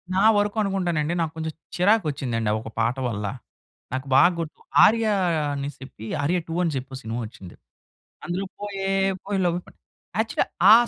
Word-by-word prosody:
నా 190 - +3 0.2
వరుకనుకుంటానండి 195 -6 0
నాకు 160 -1 -1
కొంచెం 160 -1 -4 0.2
చిరాకు 200 +2 +4
వచ్చిందండి, 120 -6 -1
ఆ - - +2
ఒక 110 - -7
పాట 115 +2 +2
వల్ల. 105 -2 -3 0.7
నాకు 130 +1 -3
బాగా 175 +7 +7
గుర్తు. 160 -2 -5 0.3
'ఆర్య' 225 0 +3 0.4
అనిసేప్పి, 140 -5 -7 0.2
'ఆర్య 165 +6 +2
టు' 165 +1 -2
అని 165 -3 0
చెప్పి 130 0 -5
ఓ - - -5
సినిమా 115 0 -4
వచ్చింది. 95 -5 -11 0.7
అందులో 180 +3 -2
పోయే 195 -2 -3 0.4
పోయే 200 -1 -1
లవ్వే 175 0 +1
పోని - - -18 0.4
యాక్చువల్లీ 220 0 +1 0.2
ఆ - - +12
165 Hz, 160 wpm, -24 LUFS, 130-195 Hz, 0.7 s, ఆ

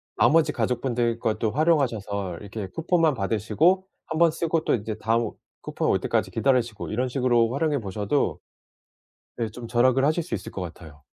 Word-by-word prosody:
나머지 165 0 +4
가족분들 120 -2 0
것도 110 -1 0
활용하셔서 110 - 0
이렇게 100 -1 -6
쿠폰만 165 - +1
받으시고 115 - +1 0.2
1 160 - -4
번 170 -1 +5
쓰고 165 0 -1
또 - - +1
이제 110 -1 -4
다음 115 0 +1 0.3
쿠폰 - - -2
올 - - +3
때까지 - - 0
기다리시고 125 -5 0
이런 125 +4 0
식으로 120 -3 +2
활용해 150 0 0
보셔도 100 - -1 1.0
네 115 -2 -1
좀 115 +1 -9
절약을 130 +3 +3
하실 155 +3 +1
수 165 - -8
있을 - - -7
것 95 - -5
같아요. 80 -5 -10
120 Hz, 365 characters per minute, -25 LUFS, 105-150 Hz, 1.0 s, 번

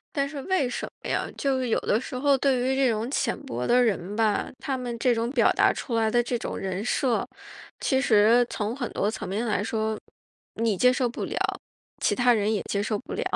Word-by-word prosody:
但 280 -1 +1
是 285 -1 -6
为 360 -6 +1
什 - - -4 0.2
么 - - -6
呀， - - 0
就 275 -2 +1
是 255 -2 -2
有 - - +2
的 215 - +1
时 260 - -8
候， 275 +1 +3
对 265 -1 +2
于 260 +2 +1
这 265 -2 +3
种 220 +2 -2
浅 265 -4 -1
薄 120 +1 -3
的 250 +1 +4
人 205 -3 -1
吧， 220 -2 +1
他 270 - -2
们 245 -2 -4
这 245 0 +3
种 230 +1 -1
表 255 -4 +3
达 - - +4
出 240 - -5
来 220 -1 +2
的 240 - +3
这 240 0 -2
种 - - -5
人 190 +1 -3
设， 245 -2 +1 0.5
其 265 -2 +1
实 230 0 +5
从 215 +3 -2
很 245 -4 -4
多 200 - 0
层 215 -3 -6
面 210 +5 -2
来 205 -3 0
说， 220 0 -2 0.6
你 225 -3 0
接 250 +6 +5
受 255 -1 0
不 235 - -5
了， - - -5 0.6
其 - - +2
他 245 -1 +4
人 215 0 +1
也 210 - 0
接 200 - 0
受 210 0 -1
不 260 - -9
了。 - - -2
235 Hz, 250 characters per minute, -26 LUFS, 215-255 Hz, 0.6 s, 实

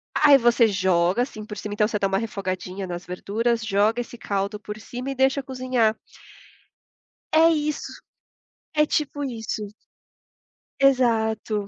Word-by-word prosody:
Aí 290 -2 +7
você 240 -2 +4
joga, 185 0 +2
assim, 215 -4 -7
por 210 0 -8
cima, 205 +1 -5
então 210 0 +2
você 215 - -2
dá 195 - +2
uma 195 0 0
refogadinha 190 -3 -4
nas 175 0 -6
verduras, 225 +6 -1
joga 215 +3 +2
esse 240 0 -9
caldo 200 0 -2
por 210 0 -8
cima 245 +4 -6
e - - -5
deixa 265 +2 +2
cozinhar. 255 -4 0 1.4
É 325 +1 +7
isso, 300 -2 -1 0.8
é 300 0 +4
tipo 295 -1 -1
isso. 225 -4 -4 1.2
Exato. 225 -6 +2
225 Hz, 140 wpm, -24 LUFS, 200-255 Hz, 1.4 s, Aí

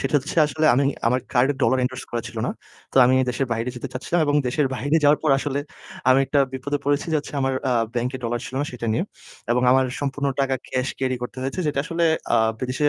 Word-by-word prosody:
সেটা 135 +2 -2
হচ্ছে 145 +5 -7
আসলে 155 +2 0
আমি 140 +3 +3 0.2
আমার 125 +2 +2
কার্ডে 130 +4 +3
ডলার 130 +3 +3
endorse 130 0 -4
করা 120 -1 -2
ছিল 120 - -12
না। - - -1 0.4
তো - - -7
আমি 130 +1 +4 0.2
দেশের 130 +2 -1
বাইরে 115 +2 -2
যেতে 135 - -5
চাচ্ছিলাম 165 +7 -1
এবং 145 - +1
দেশের 140 +3 +1
বাইরে 145 +5 +1
যাওয়ার 145 +1 +5
পর 155 - +2
আসলে 140 0 -2 0.5
আমি 130 - +6
একটা 145 - +2
বিপদে 145 +2 -2
পড়েছি 145 +1 +1
যে - - +4
হচ্ছে 145 - -8
আমার 135 0 +1 0.2
আ - - +3 0.2
ব্যাংকে 125 +2 -1
ডলার 120 +1 -1
ছিল - - -9
না 145 - -1
সেটা 120 -1 -5
নিয়ে 165 - 0 0.5
এবং 125 +1 +1
আমার 130 +1 +5 0.2
সম্পূর্ণ 140 0 -2
টাকা 135 -1 +1 0.2
cash 130 0 -1
carry 130 -1 0
করতে 125 +1 -6
হয়েছে। 135 +8 -3
যেটা 145 -2 -1
আসলে 170 +2 0 0.3
আ - - +5 0.2
বিদেশে 130 +3 +1
135 Hz, 230 wpm, -23 LUFS, 125-145 Hz, 0.5 s, আমি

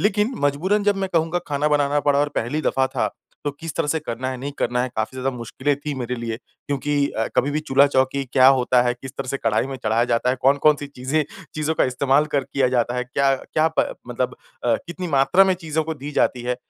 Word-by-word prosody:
लेकिन 210 +4 +1
मजबूरन 185 +9 +1
जब 205 -1 +3
मैं 195 -1 -2
कहूँगा 165 +1 +1
खाना 145 +1 +1
बनाना 145 -1 +2
पड़ा 145 0 +2
और 145 +1 +2
पहली 125 +7 -1
दफ़ा 135 0 +2
था - - -1 0.3
तो 145 - 0
किस 160 +3 -8
तरह - - 0
से 160 - +1
करना 130 -2 -4
है 130 - -4
नहीं 140 +2 -5
करना 125 +1 0
है 130 - -1
काफ़ी 110 +4 -2
ज़्यादा 130 +1 -1
मुश्किलें 130 +4 -1
थी 145 +1 -5
मेरे 125 -1 -3
लिए। 115 -1 -4
क्योंकि 145 +4 -5
अ, 110 - -2
कभी 130 +3 +3
भी 150 +1 -1
चूल्हा-चौकी 135 -1 +2
क्या 130 -1 +6
होता 125 0 +3
है, 120 0 +1
किस 130 +2 -9
तरह 135 -2 -5
से 140 - -1
कढ़ाई 110 +3 +1
में 135 - -5
चढ़ाया 110 +2 +2
जाता 120 +2 +2
है, 130 - -1
कौन-कौन 140 +3 +4
सी 145 - -6
चीज़ें 140 +2 -1 0.3
चीज़ों 155 +1 -1
का - - +3
इस्तेमाल 135 +3 +2
कर 140 - +2
किया 130 -1 +1
जाता 120 -1 0
है, 125 - -1
क्या 135 +2 +2
क्या 155 +4 0
प - - +4 0.2
मतलब - - -2 0.3
अ, - - +3
कितनी 175 +1 -5
मात्रा 145 +6 +4
में 190 -1 +2
चीज़ों 160 -3 -2
को 160 - -3
दी 145 0 -7
जाती 125 -3 +1
है। 125 0 -1
140 Hz, 235 wpm, -22 LUFS, 125-150 Hz, 0.3 s, क्या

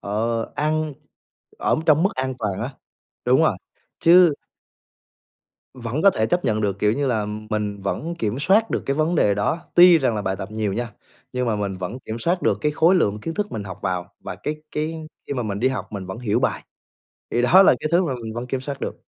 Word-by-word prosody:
ờ, 115 +3 -1
ăn 155 +1 0 0.7
ở - - +1
trong 155 0 +5
mức 195 - +3
an 130 0 -2
toàn 100 -5 -2
á. 125 +4 -4 0.5
Đúng - - +4
rồi. - - +2 0.4
Chứ 175 -1 +6 1.4
vẫn 125 +3 -3
có 200 - +7
thể 110 -11 0
chấp 175 +8 0
nhận 110 -1 +1
được, 100 -2 -1
kiểu 105 +1 +2
như 140 +4 -1
là, 110 -5 0 0.2
mình 105 -2 -2
vẫn 160 - -3
kiểm 115 -6 -2
soát 200 +9 +3
được - - -1
cái 140 - +1
vấn 155 +3 +1
đề 105 -10 +3
đó, 105 +11 0 0.2
tuy 175 -1 +8
rằng 130 -6 +1
là 105 - -2
bài 95 0 -1
tập 95 +2 -7
nhiều 110 -2 -2
nha, 115 +2 -3 0.4
nhưng 125 0 -1
mà 110 -2 0
mình 100 -2 -3
vẫn 90 +7 -5
kiểm 110 +1 -5
soát 175 +9 0
được - - +2
cái 150 -1 0
khối 165 +5 +4
lượng 105 - +1
kiến 165 +8 -5
thức 210 +2 -3
mình 105 - -4
học 95 0 -8
vào, 90 -2 -3
và - - -6
cái 150 - -4 0.2
cái 160 +1 -3 0.2
khi - - -3
mà 125 - -1
mình 100 -2 -3
đi 130 - +3
học 130 - -4
mình 100 -3 -5
vẫn 95 +4 -6
hiểu 115 -4 0
bài. - - 0 0.7
Thì 120 - +1
đó 180 +10 +7
là - - +6
cái 155 - -2
thứ 175 +2 +5
mà 140 -6 -2
mình 110 -1 -6
vẫn 120 +1 -4
kiểm 130 +1 -2
soát 140 +1 -6
được. - - -4
125 Hz, 235 wpm, -22 LUFS, 105-155 Hz, 1.4 s, tuy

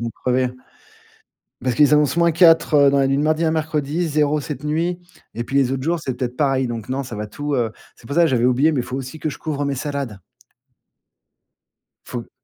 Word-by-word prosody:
vont 115 0 -3
crever. 125 0 +1 1.1
Parce 125 -2 0
qu'ils 150 -1 +5
annoncent 150 +2 +2
moins 170 -1 +4
4 160 -4 +5
dans 140 - +2
la 135 - +3
nuit 135 - +1
de - - +1
mardi 155 +2 +1
à 160 - +2
mercredi, 160 +1 -1
0 150 0 +1
cette 145 -2 -6
nuit 165 +4 -1 0.4
et 120 - -3
puis 135 - -3
les 135 -2 +3
autres 130 -1 -2
jours, 170 +1 0
c'est 130 -3 -3
peut-être 125 -1 -4
pareil. 135 -3 +1
Donc, 115 -3 -5
non, 135 +2 -2
ça 120 - -8
va 105 0 -4
tout, 145 +6 -4
heu 115 -4 0 0.2
c'est 115 - -18
pour 140 - -5
ça 170 - +6
que 165 - +4
j'avais 125 -4 +1
oublié, 135 +6 +3
mais 135 - 0
il - - -2
faut 130 - -5
aussi 135 +3 -6
que 155 - -2
je - - -9
couvre 145 -2 -3
mes 140 -1 -2
salades. 140 -7 -4 1.9
Faut 120 -2 -7
140 Hz, 225 wpm, -21 LUFS, 130-155 Hz, 1.9 s, ça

